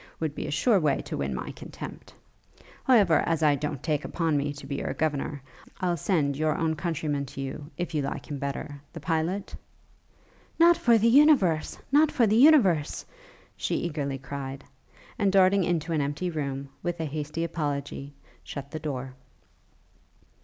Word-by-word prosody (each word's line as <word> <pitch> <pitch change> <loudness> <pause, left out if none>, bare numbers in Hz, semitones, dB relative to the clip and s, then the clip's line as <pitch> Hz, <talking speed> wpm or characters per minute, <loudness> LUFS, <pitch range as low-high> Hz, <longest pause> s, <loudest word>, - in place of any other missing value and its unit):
would 160 -2 -2
be - - -5
a - - -4
sure 205 - +3
way 150 -4 +1
to - - -5
win 70 -1 -2
my 65 - -4
contempt. - - -9 0.7
However, 205 -11 +5
as 165 -1 +1
I 150 -1 +5
don't 145 -2 -3
take 150 -2 0
upon 165 -3 -1
me 145 0 0
to 145 - -10
be 140 - -4
your - - -3
governor, 145 -2 -2 0.4
I'll 180 -2 +1
send 150 -4 0
your 155 +1 0
own 160 -1 0
countryman 150 -4 -2
to 135 - -7
you, 135 +2 -6
if 175 -1 -3
you 150 - +1
like 140 - -4
him 145 -2 -5
better, 140 +1 -5
the 165 - -7
pilot?' 165 +5 -2 1.0
'Not 340 +1 +7
for 235 -7 +4
the 225 +1 +3
universe! 235 - +4
Not 300 +2 +5
for 240 - +3
the 215 0 +2
universe!' 225 - +5 0.5
she - - -2
eagerly 145 -5 -2
cried, 135 0 -6 0.6
and, 200 -2 +3
darting 195 0 +5
into 170 -1 -1
an 155 - +1
empty 145 +6 -2
room, 140 -3 -4
with 175 -1 -3
a 160 - -1
hasty 150 +2 -3
apology, 145 -3 -4 0.3
shut 140 -1 -7
the 155 - -4
door. 135 -4 -4
155 Hz, 170 wpm, -27 LUFS, 140-180 Hz, 1.0 s, Not